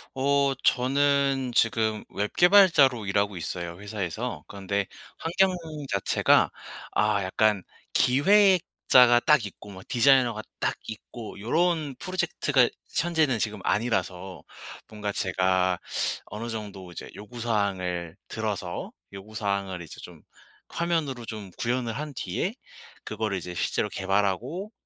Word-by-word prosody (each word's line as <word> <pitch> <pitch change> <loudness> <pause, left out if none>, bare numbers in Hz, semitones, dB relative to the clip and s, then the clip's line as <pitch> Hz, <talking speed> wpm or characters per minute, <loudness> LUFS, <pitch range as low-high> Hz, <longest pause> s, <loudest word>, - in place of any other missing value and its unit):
어 140 0 +2
저는 135 0 +2
지금 110 -1 +2
웹 105 +1 -3
개발자로 170 - +5
일하고 100 0 0
있어요 85 +1 -5
회사에서. 100 -4 -4
그런데 100 0 -2 0.3
환경 185 +3 +2 0.4
자체가 100 -2 +3 0.4
아 105 -2 +2
약간 100 +1 +1 0.3
기획자가 145 -5 +5
딱 150 -7 +4
있고 105 +1 -10
뭐 95 -1 -10
디자이너가 125 -2 +4 0.2
딱 - - 0
있고 110 0 -9
요런 155 - 0
프로젝트가 160 -8 +1 0.3
현재는 160 -7 +1
지금 105 -3 -2
아니라서 95 -3 -1 0.5
뭔가 105 -1 -4
제가 95 -1 +1 0.5
어느 110 +4 -6
정도 100 -5 -7
이제 85 - -8
요구사항을 100 -7 -2
들어서 105 -5 -4 0.2
요구사항을 100 -2 -3
이제 80 - -10
좀 - - -12 0.5
화면으로 160 -8 -2
좀 105 -4 -7
구현을 120 -1 -1
한 150 +4 -5
뒤에 - - -2 0.5
그거를 110 -2 -2
이제 90 0 -6
실제로 - - -1
개발하고 100 - -1
110 Hz, 270 characters per minute, -26 LUFS, 100-135 Hz, 0.5 s, 개발자로